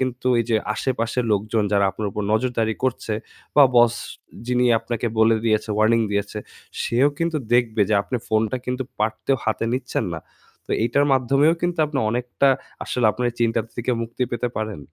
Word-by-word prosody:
কিন্তু 130 -1 -1
এই - - -1
যে 110 - +4 0.2
আশেপাশের 125 0 -1
লোকজন 105 +2 0
যারা 100 -1 +3
আপনার 105 +1 -4
উপর 105 - -4
নজরদারি 115 -1 0
করছে 125 -3 -1 0.4
বা 145 - +9
boss 120 -1 +6 0.5
যিনি 125 0 +2
আপনাকে 120 0 -3
বলে 110 0 +5
দিয়েছে, 110 -1 +1
warning 115 +2 +4
দিয়েছে 100 +1 -2 0.4
সেও 125 +5 +3
কিন্তু 165 -1 0 0.2
দেখবে 115 -3 +3
যে 110 - +2
আপনি 125 - -3
ফোনটা 110 +2 +1
কিন্তু 125 +1 -2 0.2
পারতেও 110 +5 0
হাতে 110 0 0
নিচ্ছেন 125 -2 -2
না। 80 - -6 0.5
তো - - -12
এইটার 120 +5 +2
মাধ্যমেও 135 +5 +3
কিন্তু 175 -1 -1
আপনি 145 -2 -3
অনেকটা 125 +3 +1 0.4
আসলে 120 -3 0
আপনার 125 +3 -2
এই 115 - -16
চিন্তাটা 115 -1 0
থেকে 120 +1 -2
মুক্তি 115 +2 -4
পেতে 120 +1 -1
পারেন। 110 -3 -3
115 Hz, 175 wpm, -22 LUFS, 110-125 Hz, 0.5 s, বা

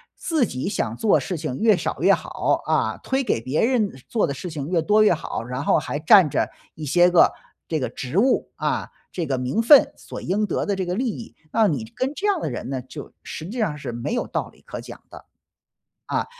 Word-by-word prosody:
自 320 -6 0
己 130 - -4
想 115 - -2
做 215 - +3
事 180 - -4
情 155 -4 -4
越 220 -2 +5
少 - - -3
越 - - +5
好， - - -1
啊， - - 0
推 265 +1 0
给 225 - 0
别 130 +6 0
人 230 -5 +1 0.2
做 225 - +1
的 140 - -2
事 175 +6 -6
情 145 -4 -5
越 175 -2 +2
多 210 +5 +4
越 210 - +5
好， 155 - -4
然 125 +3 -4
后 - - +4
还 145 - -4
占 180 +3 +7
着 - - 0 0.3
一 155 - -8
些 175 +5 +5
个 175 - +6 0.4
这 160 - -1
个 130 - -2
职 130 +6 -5
务， 255 +5 +2
啊， - - -2 0.2
这 175 - -3
个 135 -2 0
名 125 - 0
分 265 +4 +7
所 - - -8
应 205 +4 0
得 - - -1
的 205 - 0
这 190 -1 -2
个 180 - -1
利 250 +6 -1
益， 230 +1 -8 0.2
让 220 -5 +3
你 125 -6 -3
跟 260 +2 -1
这 395 - -4
样 400 -4 +2
的 - - -2
人 - - -5
呢， 135 -2 -3
就 135 +3 -10
实 160 - -7
际 245 +4 -5
上 170 -10 0
是 140 - -5
没 120 - -4
有 245 - -1
道 - - -3
理 - - -23
可 - - -7
讲 - - -10
的。 - - -12 0.8
啊， - - 0
175 Hz, 255 characters per minute, -23 LUFS, 140-220 Hz, 0.8 s, 占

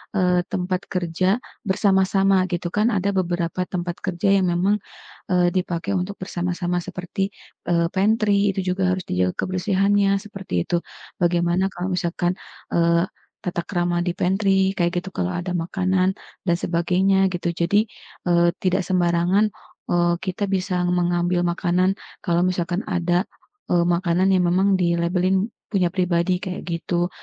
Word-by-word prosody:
eee, 180 -2 +3
tempat 185 0 -2
kerja 185 +4 0 0.3
bersama-sama 195 -1 +3
gitu 175 0 -2
kan, 210 +4 +2
ada 200 +1 +1
beberapa 175 -1 -1
tempat 175 -1 -4
kerja 185 +1 0
yang 185 - +2
memang, 190 +4 +2 0.5
eee, 180 -1 +4
dipakai 180 +1 -1
untuk 185 +3 -3
bersama-sama 180 -1 -2
seperti, 185 +2 -4 0.4
eee, 170 -1 +3
pantry, 205 0 +2
itu 190 - 0
juga 185 -1 +1
harus 185 - -5
dijaga 90 0 0
kebersihannya 195 +2 +2
seperti 190 - -3
itu, 175 - +1 0.4
bagaimana 175 +2 +2
kalau 180 +2 -3
misalkan, 175 0 0 0.4
eee, 170 +1 +3 0.4
tata 175 -1 -2
krama 175 -2 0
di 175 - 0
pantry 190 0 +2
kayak 175 0 +1
gitu, 190 - -7
kalau 90 0 -1
ada 180 +1 -3
makanan 185 +2 0 0.3
dan 170 - +4
sebagainya, 190 +3 +2
gitu. 175 -1 -1
Jadi, 205 +6 +2 0.4
eee, 170 0 +4
tidak 185 +1 +2
sembarangan, 180 +3 +2 0.4
eee, 175 0 +3
kita 190 +2 -2
bisa 185 -1 0
mengambil 175 0 +1
makanan 180 +1 +1 0.3
kalau 170 -2 +1
misalkan 180 +1 -1
ada, 175 0 +1 0.5
eee, 175 -1 +4
makanan 175 +2 +2
yang 180 -2 +3
memang 190 +2 +3
dilabelin 180 +4 +1 0.2
punya 185 -4 +2
pribadi, 180 0 +1
kayak 185 0 -5
gitu. 175 +1 -1
180 Hz, 140 wpm, -22 LUFS, 175-190 Hz, 0.5 s, eee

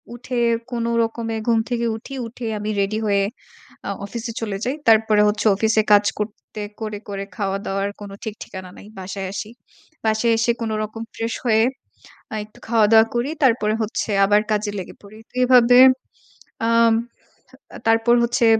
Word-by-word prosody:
উঠে 245 0 -4 0.3
কোনরকমে 230 -1 -1
ঘুম 230 -1 +4
থেকে 235 -1 -1
উঠি, 270 +4 -9
উঠে 235 +1 -8
আমি 210 - -4
রেডি 200 +2 -1
হয়ে 200 -1 +2 0.7
আ - - -1 0.2
অফিসে 230 +2 -5
চলে 205 -3 -3
যাই। 255 +3 -1
তারপরে 220 -1 +5
হচ্ছে 210 +1 -1
অফিসে 220 +1 +2
কাজ 205 0 +6
করতে 210 0 -6 0.2
করে, 215 -2 -4
করে 195 -1 -4
খাওয়া 195 -2 -1
দাওয়ার 195 +1 -1
কোনো 200 -1 -8
ঠিক 215 -2 -4
ঠিকানা 185 -2 -9
নাই। - - -12
বাসায় 190 0 -5
আসি। 210 +2 -5 0.6
বাসায় 220 +2 +2
এসে 225 +1 +2
কোনো 220 -1 -2
রকম 215 +1 -6
ফ্রেশ 230 0 -3
হয়ে 220 -1 +4 0.7
আ - - -2
একটু 215 - -20
খাওয়াদাওয়া 220 -1 +5
করি 240 +4 0
তারপরে 220 -4 +3
হচ্ছে 215 +1 -3 0.2
আবার 205 +1 +4
কাজে 210 0 0
লেগে 180 - -8
পড়ি। 205 +2 -13
তো - - -37
এভাবে, 245 -1 +6 0.9
আম 230 0 +4 0.9
তারপর 225 +1 +4
হচ্ছে 235 0 +2
220 Hz, 160 wpm, -21 LUFS, 205-230 Hz, 0.9 s, কাজ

